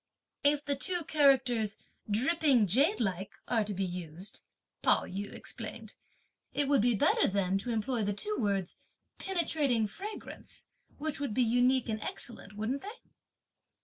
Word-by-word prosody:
"If 290 Hz, 0 st, +4 dB
two 355 Hz, 0 st, +1 dB
characters 260 Hz, -8 st, +3 dB
like -, -, -28 dB
'dripping 275 Hz, -3 st, +3 dB
jadelike' 205 Hz, -, +1 dB
are 230 Hz, -3 st, +2 dB
to 210 Hz, -, -5 dB
be 190 Hz, +1 st, 0 dB
used," 180 Hz, +2 st, -4 dB, 0.4 s
Pao -, -, +3 dB
yü 200 Hz, +2 st, -5 dB
explained, -, -, -5 dB, 0.6 s
"it 285 Hz, -, +2 dB
would 280 Hz, -4 st, +4 dB
be 240 Hz, +1 st, +3 dB
better -, -, +4 dB
then 195 Hz, -1 st, +1 dB
to 245 Hz, -, -6 dB
employ 230 Hz, +1 st, -1 dB
the 205 Hz, -, 0 dB
two 420 Hz, -, -2 dB
words 195 Hz, -4 st, -1 dB, 0.4 s
'Penetrating 300 Hz, -, +1 dB
Fragrance,' 405 Hz, -, -9 dB, 0.3 s
which 300 Hz, 0 st, -3 dB
would 280 Hz, -7 st, -3 dB
be 255 Hz, -, +4 dB
unique 245 Hz, +2 st, +3 dB
and 215 Hz, -1 st, -3 dB
excellent, 220 Hz, -4 st, -4 dB
wouldn't 225 Hz, +7 st, -2 dB
they?" 430 Hz, +4 st, -11 dB
240 Hz, 145 wpm, -31 LUFS, 205-285 Hz, 0.6 s, If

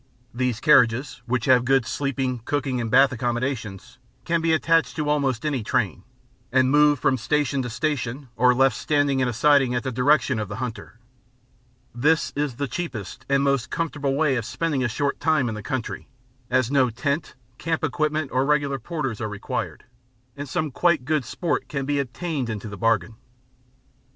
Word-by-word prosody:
These 125 Hz, -2 st, -1 dB
carriages, 125 Hz, -2 st, +3 dB
which 120 Hz, -1 st, 0 dB
have 130 Hz, -2 st, +5 dB
good 135 Hz, -1 st, +2 dB
sleeping, 130 Hz, 0 st, -2 dB
cooking, 135 Hz, -2 st, -1 dB
and 115 Hz, -, -3 dB
bath 135 Hz, +4 st, +5 dB
accommodation, 120 Hz, -4 st, -2 dB, 0.5 s
can 170 Hz, 0 st, +1 dB
be 165 Hz, 0 st, +1 dB
attached 165 Hz, +1 st, +2 dB
to 150 Hz, -2 st, -2 dB
almost 140 Hz, -4 st, 0 dB
any 140 Hz, -5 st, 0 dB
train, -, -, -1 dB, 0.5 s
and 130 Hz, 0 st, +3 dB
moved 150 Hz, -1 st, +4 dB
from 130 Hz, -, +2 dB
station 145 Hz, +2 st, 0 dB
to 125 Hz, -, -4 dB
station 135 Hz, 0 st, -3 dB
or 125 Hz, 0 st, +4 dB
left 135 Hz, -2 st, +3 dB
standing 145 Hz, -1 st, +1 dB
in 130 Hz, -, +2 dB
a -, -, 0 dB
siding 135 Hz, +1 st, +3 dB
at 120 Hz, -, -1 dB
the 130 Hz, -, -2 dB
directions 130 Hz, -1 st, +2 dB
of 105 Hz, -, -5 dB
the -, -, -5 dB
hunter. 125 Hz, -3 st, -6 dB, 1.0 s
This 150 Hz, +7 st, +1 dB
is 145 Hz, -3 st, -1 dB
the 140 Hz, +3 st, -2 dB
cheapest 125 Hz, -, -6 dB
and 140 Hz, 0 st, +3 dB
most 140 Hz, -4 st, +1 dB
comfortable 145 Hz, -5 st, -2 dB
way 140 Hz, -3 st, +2 dB
of 115 Hz, -, -3 dB
spending 150 Hz, -3 st, -1 dB
a -, -, +2 dB
short 140 Hz, +5 st, -1 dB
time 155 Hz, -4 st, +2 dB
in 115 Hz, -, -2 dB
the 105 Hz, -, -6 dB
country, 130 Hz, +2 st, -4 dB, 0.4 s
as 130 Hz, -1 st, +1 dB
no 135 Hz, -3 st, +3 dB
tent, 140 Hz, +6 st, -3 dB, 0.2 s
camp 165 Hz, -1 st, -2 dB
equipment, 155 Hz, 0 st, -1 dB
or 130 Hz, +1 st, +2 dB
regular 140 Hz, -1 st, +1 dB
porters 135 Hz, -4 st, -4 dB
are 110 Hz, -, -2 dB
required; 105 Hz, -1 st, -4 dB, 0.5 s
and 145 Hz, -1 st, -7 dB
some 155 Hz, +2 st, -2 dB
quite 170 Hz, -3 st, +2 dB
good 155 Hz, -1 st, +1 dB
sport 170 Hz, +6 st, -2 dB
can 140 Hz, -2 st, -3 dB
be 145 Hz, 0 st, 0 dB
obtained 140 Hz, 0 st, -3 dB
into 110 Hz, 0 st, -5 dB
the 100 Hz, -, -7 dB
bargain. 115 Hz, 0 st, 0 dB
135 Hz, 180 wpm, -24 LUFS, 120-150 Hz, 1.0 s, have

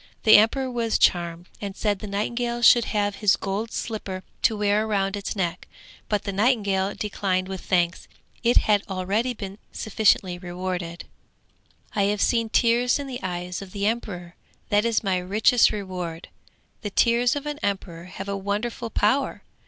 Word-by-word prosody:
The 215 Hz, -, +9 dB
emperor 255 Hz, +5 st, +2 dB
was 235 Hz, -2 st, 0 dB
charmed, 170 Hz, 0 st, +1 dB
and 200 Hz, -2 st, -5 dB
said 205 Hz, -3 st, 0 dB
the 210 Hz, -, -7 dB
nightingale 235 Hz, +4 st, -2 dB
should 235 Hz, 0 st, +7 dB
have 205 Hz, -1 st, -1 dB
his 210 Hz, -3 st, +4 dB
gold 205 Hz, +4 st, -3 dB
slipper 195 Hz, -4 st, -4 dB, 0.2 s
to 220 Hz, -, +2 dB
wear 210 Hz, +1 st, +1 dB
round 195 Hz, -2 st, 0 dB
its 200 Hz, +1 st, -4 dB
neck. 180 Hz, -2 st, -2 dB, 0.4 s
But 210 Hz, -1 st, 0 dB
the 200 Hz, -, -3 dB
nightingale 200 Hz, -3 st, +1 dB
declined 190 Hz, -3 st, -1 dB
with 190 Hz, -1 st, -6 dB
thanks; 175 Hz, -1 st, 0 dB, 0.3 s
it 240 Hz, 0 st, +3 dB
had 205 Hz, -2 st, +4 dB
already 200 Hz, +7 st, -1 dB
been 200 Hz, -1 st, -7 dB
sufficiently 195 Hz, -4 st, +1 dB
rewarded. 175 Hz, -1 st, -5 dB, 0.9 s
'I 205 Hz, -, +2 dB
have 205 Hz, +1 st, 0 dB
seen 230 Hz, -2 st, +1 dB
tears 240 Hz, +2 st, +3 dB
in 285 Hz, -, -5 dB
the 255 Hz, -2 st, -6 dB
eyes 180 Hz, -1 st, -4 dB
of 195 Hz, -2 st, -10 dB
the 200 Hz, 0 st, -2 dB
emperor; 195 Hz, -6 st, -3 dB, 0.4 s
that 205 Hz, +2 st, +3 dB
is 230 Hz, -1 st, +1 dB
my 190 Hz, -2 st, +1 dB
richest 215 Hz, +6 st, +4 dB
reward. 180 Hz, -5 st, -5 dB, 0.5 s
The 210 Hz, -, -3 dB
tears 235 Hz, +5 st, +3 dB
of 290 Hz, 0 st, -4 dB
an 295 Hz, 0 st, -4 dB
emperor 185 Hz, -4 st, -3 dB
have 190 Hz, +2 st, -8 dB
a 200 Hz, -, -2 dB
wonderful 210 Hz, +4 st, -3 dB
power! 225 Hz, +6 st, +1 dB
205 Hz, 165 wpm, -24 LUFS, 185-225 Hz, 0.9 s, The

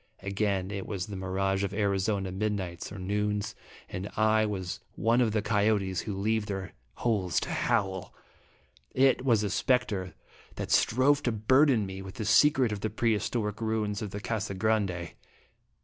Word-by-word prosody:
Again, 100 Hz, -1 st, -1 dB
It 100 Hz, -1 st, -5 dB
was 95 Hz, -4 st, -3 dB
the 100 Hz, -, -7 dB
mirage 95 Hz, +1 st, -1 dB
of 100 Hz, 0 st, -2 dB
Arizona 100 Hz, -1 st, 0 dB
midnights 95 Hz, -3 st, -3 dB
or 100 Hz, -, -7 dB
noons, 105 Hz, +2 st, -1 dB, 0.3 s
and 95 Hz, +3 st, -5 dB
I 110 Hz, 0 st, +3 dB
was 95 Hz, -3 st, -4 dB, 0.2 s
one 115 Hz, +5 st, +2 dB
of 115 Hz, -3 st, +2 dB
the 105 Hz, -1 st, 0 dB
coyotes 105 Hz, -3 st, +1 dB
who 100 Hz, -3 st, -5 dB
leave 110 Hz, +1 st, 0 dB
their 95 Hz, -2 st, -4 dB, 0.2 s
holes 95 Hz, -7 st, 0 dB
to -, -, -4 dB
howl. 95 Hz, -1 st, 0 dB, 0.8 s
It 130 Hz, -1 st, +4 dB
was 115 Hz, -5 st, +3 dB
a 105 Hz, -, 0 dB
spectre 105 Hz, -4 st, 0 dB, 0.4 s
that -, -, -5 dB
strove 140 Hz, +5 st, +4 dB
to 120 Hz, -, 0 dB
burden 120 Hz, +2 st, +3 dB
me 95 Hz, 0 st, -6 dB
with 95 Hz, 0 st, -9 dB
the 110 Hz, -, -4 dB
secret 130 Hz, +2 st, +4 dB
of 105 Hz, -, -3 dB
the 110 Hz, -, -2 dB
pre 115 Hz, +2 st, +1 dB
historic 105 Hz, 0 st, -2 dB
ruins 110 Hz, -2 st, -1 dB
of 105 Hz, -, -3 dB
the 100 Hz, -, -5 dB
Casa 105 Hz, -2 st, -3 dB
Grande. 95 Hz, -4 st, 0 dB
105 Hz, 165 wpm, -29 LUFS, 95-110 Hz, 0.8 s, It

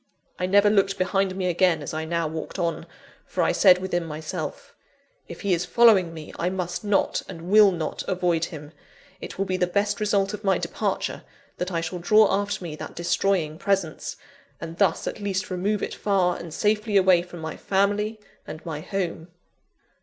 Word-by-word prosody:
I 180 Hz, -, 0 dB
never 205 Hz, +2 st, +5 dB
looked 195 Hz, -1 st, +2 dB
behind 190 Hz, 0 st, 0 dB
me 190 Hz, -1 st, -2 dB
again, 175 Hz, -3 st, +2 dB
as -, -, -6 dB
I 160 Hz, 0 st, -3 dB
now 170 Hz, 0 st, -1 dB
walked 160 Hz, +4 st, -6 dB
on; 170 Hz, -2 st, -2 dB, 0.4 s
for -, -, -1 dB
I -, -, +3 dB
said 185 Hz, -3 st, +6 dB
within 180 Hz, -2 st, -2 dB
myself: 155 Hz, -1 st, -6 dB, 0.5 s
"If -, -, -9 dB
he 200 Hz, -3 st, +1 dB
is 175 Hz, 0 st, +1 dB
following 200 Hz, -4 st, +5 dB
me, 160 Hz, -2 st, -9 dB
I 175 Hz, -, +1 dB
must 180 Hz, 0 st, -3 dB
not, 205 Hz, -1 st, +1 dB
and 170 Hz, +2 st, -7 dB
will 210 Hz, -1 st, +7 dB
not 165 Hz, -4 st, -3 dB
avoid 175 Hz, -3 st, +1 dB
him: 150 Hz, -2 st, -9 dB, 0.5 s
it -, -, -8 dB
will 195 Hz, -, 0 dB
be 185 Hz, -1 st, -1 dB
the 180 Hz, -, +1 dB
best 200 Hz, +3 st, 0 dB
result 200 Hz, -1 st, +1 dB
of 210 Hz, +1 st, -6 dB
my 195 Hz, -1 st, +3 dB
departure, -, -, -2 dB, 0.4 s
that 180 Hz, +1 st, -3 dB
I 165 Hz, -2 st, -1 dB
shall 165 Hz, +2 st, -4 dB
draw 210 Hz, +4 st, +5 dB
after 205 Hz, -1 st, -1 dB
me 160 Hz, -3 st, -5 dB
that -, -, -8 dB
destroying 170 Hz, -2 st, 0 dB
presence; 195 Hz, -6 st, -1 dB, 0.4 s
and 165 Hz, 0 st, -8 dB
thus 190 Hz, -5 st, +2 dB
at -, -, -4 dB
least 200 Hz, -1 st, -2 dB
remove 195 Hz, +3 st, -1 dB
it -, -, -3 dB
far 185 Hz, -4 st, +1 dB
and 170 Hz, -1 st, -8 dB
safely 210 Hz, +3 st, +1 dB
away 185 Hz, -2 st, +5 dB
from 175 Hz, -1 st, -10 dB
my 160 Hz, -1 st, -5 dB
family 205 Hz, +3 st, 0 dB, 0.3 s
and 155 Hz, -, -8 dB
my 160 Hz, -3 st, -4 dB
home!" 175 Hz, -3 st, -3 dB
185 Hz, 190 wpm, -25 LUFS, 170-200 Hz, 0.5 s, will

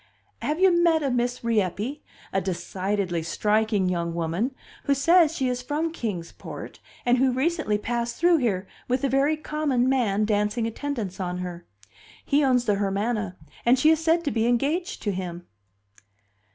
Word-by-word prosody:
Have 305 Hz, +3 st, -1 dB
you, 380 Hz, 0 st, +6 dB
met 340 Hz, -2 st, +3 dB
a 275 Hz, -, 0 dB
Miss 245 Hz, 0 st, -1 dB
Rieppe, 225 Hz, -, -1 dB, 0.3 s
a 195 Hz, -, +2 dB
decidedly 185 Hz, 0 st, -2 dB
striking 210 Hz, +3 st, +1 dB
young 170 Hz, -2 st, -1 dB
woman, 170 Hz, +11 st, -1 dB, 0.3 s
who 280 Hz, -, +3 dB
says 330 Hz, +3 st, +4 dB
she 265 Hz, -, 0 dB
is 250 Hz, 0 st, -1 dB
from 300 Hz, +6 st, -2 dB
Kings 205 Hz, -, -4 dB
Port, -, -, -9 dB, 0.3 s
and 245 Hz, 0 st, +3 dB
who 260 Hz, 0 st, +4 dB
recently 270 Hz, -4 st, 0 dB
passed 235 Hz, +2 st, -2 dB
through 345 Hz, 0 st, +4 dB
here 200 Hz, -8 st, -1 dB, 0.2 s
with 255 Hz, +1 st, 0 dB
a 275 Hz, -, +2 dB
very 275 Hz, +4 st, +2 dB
common 300 Hz, -5 st, 0 dB
man 220 Hz, -6 st, +2 dB
dancing 210 Hz, +2 st, 0 dB
attendance 225 Hz, -5 st, -4 dB
on 180 Hz, -1 st, -2 dB
her? 175 Hz, -1 st, -6 dB, 0.6 s
He 290 Hz, +1 st, +3 dB
owns 250 Hz, -3 st, +3 dB
the 205 Hz, -3 st, +2 dB
Hermana, 200 Hz, -1 st, -1 dB, 0.3 s
and 245 Hz, +2 st, +5 dB
she 305 Hz, +5 st, +5 dB
is 320 Hz, 0 st, +1 dB
said 330 Hz, +1 st, +3 dB
to 290 Hz, -, -1 dB
be 225 Hz, 0 st, +1 dB
engaged 295 Hz, -, 0 dB
to 205 Hz, -, 0 dB
him." 180 Hz, -2 st, -5 dB
240 Hz, 165 wpm, -25 LUFS, 195-285 Hz, 0.6 s, you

